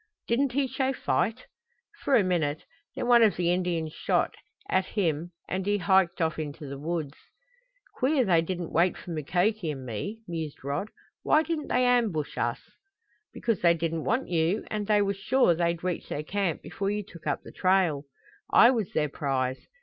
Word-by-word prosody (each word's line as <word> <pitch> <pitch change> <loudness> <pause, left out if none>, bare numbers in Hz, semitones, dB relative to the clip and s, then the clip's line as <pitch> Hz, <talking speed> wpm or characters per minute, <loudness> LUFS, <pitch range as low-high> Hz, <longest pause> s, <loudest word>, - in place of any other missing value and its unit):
"Didn't 250 +2 +1
he 280 +1 +2
show 265 +1 -1
fight?" 245 -1 -1 0.5
"For 275 - +2
a 215 - +5
minute. 160 -5 -1 0.3
Then - - -3
one 240 -1 +6
of 220 -3 +5
the 175 -1 +1
Indians 170 -4 -1
shot, - - 0 0.3
at 185 0 +1
him 170 -4 -1 0.2
and 190 +1 -2
he 205 +2 +1
hiked 190 -2 +3
off 160 -1 0
into 150 -1 -5
the 140 0 -7
woods." 155 -2 -3 0.8
"Queer 265 -1 +2
they 170 -4 +4
didn't 175 0 -4
wait 175 +3 +2
for 175 - -9
Mukoki 175 +5 0
and 135 -3 -5
me," 200 - -5
mused 160 -5 -5
Rod. 145 +9 -2 0.3
"Why 310 - +4
didn't 315 -2 -3
they 250 0 +2
ambush 225 -12 +1
us?" - - -2 0.7
"Because 230 -5 -1
they 170 -1 +5
didn't 165 -1 -2
want 245 +4 0
you, 170 +3 +1
and 210 -1 -2
they 210 -1 +4
were 200 0 0
sure 200 +1 +3
they'd 170 0 -1
reach 180 -2 -3
their 150 - -3
camp 190 -1 -2
before 195 0 -3
you 210 0 -1
took 170 -4 -12
up - - -1
the - - -11
trail. 185 -6 +2 0.4
I 235 - +7
was 225 -8 -1
their 150 - +1
prize. 135 -3 -2
180 Hz, 180 wpm, -27 LUFS, 160-215 Hz, 0.8 s, I